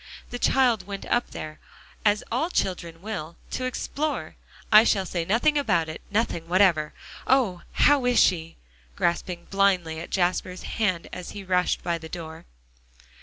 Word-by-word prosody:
"The 245 - -4
child 240 -9 +2
went 200 -1 -6
up 240 - 0
there, 155 0 -7 0.4
as 210 0 +3
all 265 +9 0
children 175 - -2
will, 170 -7 -5
to 255 - -2
explore. 290 +4 -3 0.4
I 215 0 +9
shall 195 -4 +2
say 170 -2 -2
nothing 285 - +3
about 170 - +1
it 155 - -7
nothing 205 -6 -1
whatever. 175 -4 +3 0.3
Oh! 235 -10 +2
how 290 -3 +4
is 245 - +4
she?" 165 -2 +2 0.4
grasping 175 0 -1
blindly 185 -5 +2
at 170 - -7
Jasper 180 0 0 0.5
as 180 -1 -8
he 200 - -7
rushed 180 -1 +1
by 170 -1 -1
the 160 0 -9
door. 160 -2 -8
185 Hz, 150 wpm, -25 LUFS, 170-225 Hz, 0.5 s, I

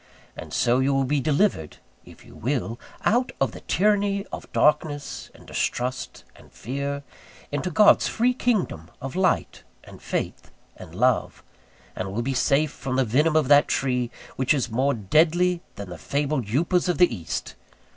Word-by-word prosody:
And - - -9
so 120 +2 +2
you 135 +1 +2
will 135 - +2
be 140 +2 +1
delivered 150 - 0 0.3
(if - - -16
you - - -15
will) 120 -3 -2 0.3
out 245 +3 +2
of 135 - +1
the - - -10
tyranny 200 +1 +1
of - - -8
darkness, 150 -1 0
and - - -16
distrust, 125 +2 -3
and - - -18
fear, 140 +4 -4 0.5
into 145 +5 -2
God's 205 +5 +5
free 245 +2 +1
kingdom 210 - -1
of 135 +3 -6
light, 185 -1 0 0.2
and - - -14
faith, - - -4 0.3
and - - -12
love; - - +1 0.5
and 95 +1 -4
will 115 +4 -2
be 135 +2 -1
safe 140 +3 +2
from 130 -2 -4
the 135 0 +2
venom 150 +8 +2
of 155 -4 +3
that 145 0 +6
tree 125 -3 0 0.3
which 130 +3 +2
is 125 -4 -2
more 135 +5 +1
deadly 165 - +2
than 100 -2 -8
the 90 - -8
fabled 140 -4 -1
upas 170 - +1
of 175 - +1
the 175 -9 +4
East. 85 -5 -5
140 Hz, 165 wpm, -24 LUFS, 125-170 Hz, 0.5 s, that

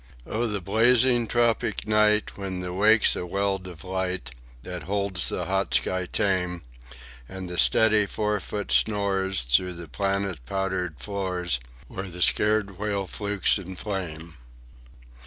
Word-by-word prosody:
"'O 115 +2 -1
the 105 -3 -2
blazing 120 +5 +3
tropic 120 -2 0
night, 105 0 +3
when 95 -2 -5
the 90 0 -5
wake's 110 +4 +4
a - - -3
welt 95 +1 -1
of 85 -4 -10
light 95 -1 -3 0.3
That 90 +3 -6
holds 100 -2 -1
the - - -3
hot - - 0
sky 95 -1 0
tame, 90 -3 0 0.7
And 95 -1 -7
the 90 0 -3
steady 110 -2 +4
forefoot 105 0 -3
snores 95 -5 +2
through - - +2
the 85 -1 -8
planet 95 +1 -2
powdered 95 -5 -2
floors 90 -3 -1 0.3
Where 95 0 -6
the 90 0 -1
scared 105 -3 +2
whale 100 -2 -1
flukes 100 +1 +1
in 95 0 -8
flame. 85 -6 -5
95 Hz, 140 wpm, -25 LUFS, 90-105 Hz, 0.7 s, wake's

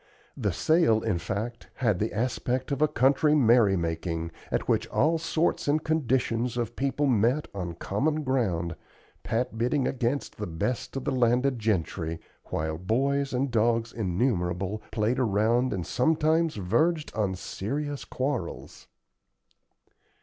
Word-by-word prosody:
The - - -1
sale, 155 -9 +3
in 105 -6 0
fact, 110 +7 -4
had 110 -8 +1
the 110 - -1
aspect 125 +3 -1
of 140 +1 -1
a 155 - +6
country 145 +2 +3
merrymaking, 90 - +2 0.2
at - - -1
which 115 0 +1
all 160 +7 +2
sorts 165 -1 0
and 150 +2 +2
conditions 125 -6 0
of 120 -3 -2
people 140 +2 0
met 125 +3 +2
on 90 -4 -4
common 150 - -1
ground, 95 - 0 0.5
Pat 115 0 -2
bidding 125 +3 +1
against 130 +2 -2
the 105 - -4
best 85 +13 -3
of 135 - -3
the - - 0
landed 125 +1 +2
gentry, 85 -6 -1 0.3
while 80 0 -3
boys 135 +8 0
and 130 +1 0
dogs 115 0 +1
innumerable 95 -2 -1
played 115 +4 0
around 115 +2 +2
and 90 -4 -2
sometimes 160 +4 +2
verged 150 - +1
on 100 -3 0
serious 140 +10 -4
quarrels. 130 0 -4
120 Hz, 135 wpm, -27 LUFS, 100-140 Hz, 0.5 s, a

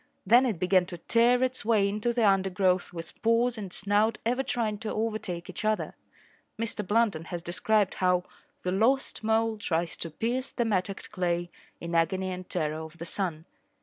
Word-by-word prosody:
Then 240 +6 +6
it 220 -7 -1
began 180 0 +3
to 175 - -7
tear 240 +7 +3
its 255 0 -1
way 210 -2 +3
into 210 +4 -1
the 235 -3 +3
undergrowth 190 -2 +2
with 165 -1 -9
paws 230 +2 +3
and 200 -5 -6
snout 205 +3 +1
ever 250 +3 +1
trying 225 -5 -1
to 220 - -4
overtake 215 -6 -3
each - - -7
other. 215 0 0 0.6
Mr 225 -2 -2
Blunden 205 -5 +1
has 170 0 -5
described 200 +3 +1
how 180 -1 +2 0.4
The 180 - -1
lost 230 +6 +1
mole 220 0 +1
tries 170 -4 -1
to 165 - -5
pierce 240 - -2
the 240 - -1
mattocked 195 -2 -2
clay 175 -1 -1 0.3
In 170 0 -6
agony 185 +3 +1
and 180 0 -7
terror 155 -2 -2
of 160 +1 -11
the 170 - -6
sun. 170 -3 0
200 Hz, 180 wpm, -28 LUFS, 175-225 Hz, 0.6 s, Then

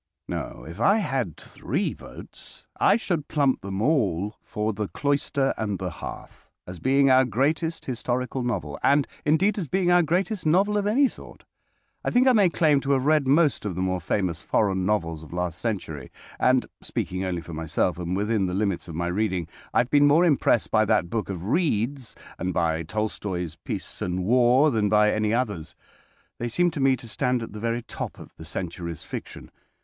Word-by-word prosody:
No, - - -5
if 85 +5 -9
I 200 - +5
had 130 - -2
three - - -3
votes, - - -12
I 200 - +5
should 170 -9 -2
plump 140 -4 +1
them 100 +1 -3
all 105 - +1
for 105 +1 -2
"The 105 0 -3
Cloister 140 0 0
and 105 -3 -2
the 90 -2 -4
Hearth," - - -9 0.2
as 90 -1 -9
being 135 +1 +3
our 130 0 +6
greatest 150 +8 -1
historical 125 +1 -2
novel, 90 - -3
and, 140 0 +3 0.2
indeed, 190 +8 +2
as 170 - -3
being 180 +2 +1
our 175 0 +6
greatest 180 +4 0
novel 190 +7 +3
of 205 -1 +1
any 265 +7 +4
sort. - - -12 0.6
I - - 0
think 250 +2 +3
I 260 - +6
may 205 -5 +5
claim 155 -4 +3
to 140 +1 +1
have 130 -1 +1
read 150 -2 +3
most 145 +1 +3
of 100 -4 -3
the 90 - -2
more 95 -1 -1
famous 90 -4 -1
foreign 95 -3 +1
novels 85 -7 -1
of 80 +1 -12
last 90 -1 -2
century, 80 - -4 0.3
and 130 0 +3 0.2
(speaking 95 +1 -3
only 90 -3 -2
for 85 - -9
myself 80 +3 -1
and 90 +1 -2
within 105 -1 +1
the 90 - -3
limits 95 -4 -1
of 85 - -7
my 85 +1 -1
reading) 90 -2 -1 0.2
I - - +4
have 125 - -5
been 145 0 +6
more 160 +5 +5
impressed 140 -7 +2
by 110 -1 +4
that 100 -5 +1
book 110 -3 -2
of 90 -2 -5
Reade's 130 - 0 0.2
and 95 +1 -2
by 80 -2 +1
Tolstoi's 90 -2 -3
"Peace - - -6
and 90 +1 -2
War" 125 +6 +4
than 105 -4 +1
by 105 0 +4
any 110 0 0
others. 100 -10 -2 0.6
They 120 - -2
seem 175 +8 +2
to 155 - -5
me 135 -1 +4
to 120 - -11
stand 125 0 0
at 115 - -8
the 105 - -7
very 115 +2 -2
top - - -6
of - - -12
the 80 - -10
century's 85 0 -5
fiction. - - -8
110 Hz, 195 wpm, -25 LUFS, 90-145 Hz, 0.6 s, our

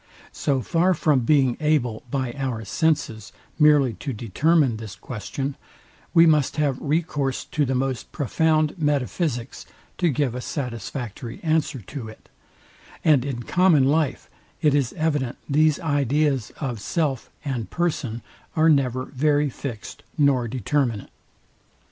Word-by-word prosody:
So 135 -3 0
far 175 - +2
from 150 -3 +3
being 130 0 +3
able 150 -8 +1
by 130 -3 -2
our 125 -5 -3
senses 115 - 0 0.3
merely 145 -5 +5
to 135 - -4
determine 130 - +2
this 110 -3 -8
question, 135 +6 -5 0.6
we 165 0 +7
must 150 -2 +3
have 145 -4 0
recourse 145 -3 -1
to 150 -1 0
the 130 0 -1
most 130 -1 -2
profound 155 - +1
metaphysics 145 -3 -1 0.3
to 175 - +3
give 140 -4 0
a 125 - -4
satisfactory 120 -2 -5
answer 155 -5 0
to 115 +4 -7
it; 110 - -14 0.8
and 150 -6 +5
in 130 -3 -4
common 180 -4 +4
life 145 +1 +1 0.3
it 150 -3 +3
is 140 -4 +1
evident 150 -6 -1
these 155 +1 +3
ideas 145 -4 +1
of 125 -6 -3
self 145 -1 -1 0.2
and 120 -8 -3
person 130 -10 -2 0.3
are 160 +1 +4
never 130 -4 +2
very 145 +1 +1
fixed 120 -4 -7 0.2
nor 140 -5 +3
determinate. 120 -2 -1
140 Hz, 130 wpm, -24 LUFS, 120-155 Hz, 0.8 s, we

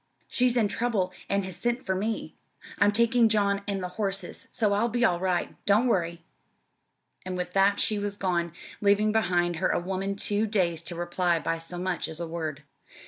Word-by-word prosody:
"She's 250 -1 +2
in 220 -3 +3
trouble 205 -4 -1 0.2
and 200 -1 +1
has 190 -2 -6
sent 240 +5 -1
for 190 - 0
me. 210 +4 -3 0.4
I'm 205 - +5
taking 235 +1 +4
John 200 -2 +2
and 195 -2 -2
the - - -1
horses, 195 -3 -3
so 215 -4 +2
I'll 220 +4 +2
be 240 +1 +2
all 175 -5 +2
right. 180 -1 -1
Don't 205 +4 +4
worry!" 170 -7 0 1.0
And 185 0 -4
with 180 0 -4
that 200 +1 +4
she 210 -1 +3
was 205 0 -3
gone, 175 -3 0 0.3
leaving 205 +1 +4
behind 175 -5 +1
her 185 - +1
a - - +1
woman 190 +2 -2
too 205 +2 0
dazed 175 -6 0
to 175 - -3
reply 175 0 0
by 165 0 -2
so 165 +2 -5
much 180 0 -1
as 160 0 -7
a 170 - -2
word. 160 -3 -4
195 Hz, 195 wpm, -27 LUFS, 175-210 Hz, 1.0 s, I'm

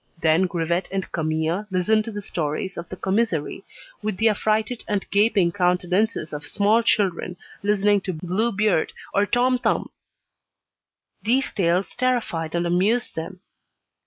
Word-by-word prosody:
Then 165 +4 +3
Grivet 170 +1 -1
and 195 -1 -3
Camille 160 +4 -1
listened 215 +4 +2
to 230 - -5
the 205 -1 -6
stories 165 +3 -3
of 170 0 -7
the - - -6
commissary 195 -4 -1 0.4
with 210 -3 -2
the 225 +2 +4
affrighted 215 +3 0
and 205 -2 -1
gaping 200 -4 +3
countenances 180 0 0
of 150 +1 -5
small 210 +3 +2
children 185 -5 0 0.2
listening 205 0 +2
to 185 - -4
"Blue 185 +8 -1
Beard" 205 -5 +1 0.2
or 200 +1 +2
"Tom 250 +2 +2
Thumb." - - 0 1.3
These 245 +7 +1
tales 180 0 +1
terrified 215 -11 -1
and 170 0 0
amused 195 +8 +1
them. 180 +3 -6
195 Hz, 140 wpm, -23 LUFS, 170-215 Hz, 1.3 s, the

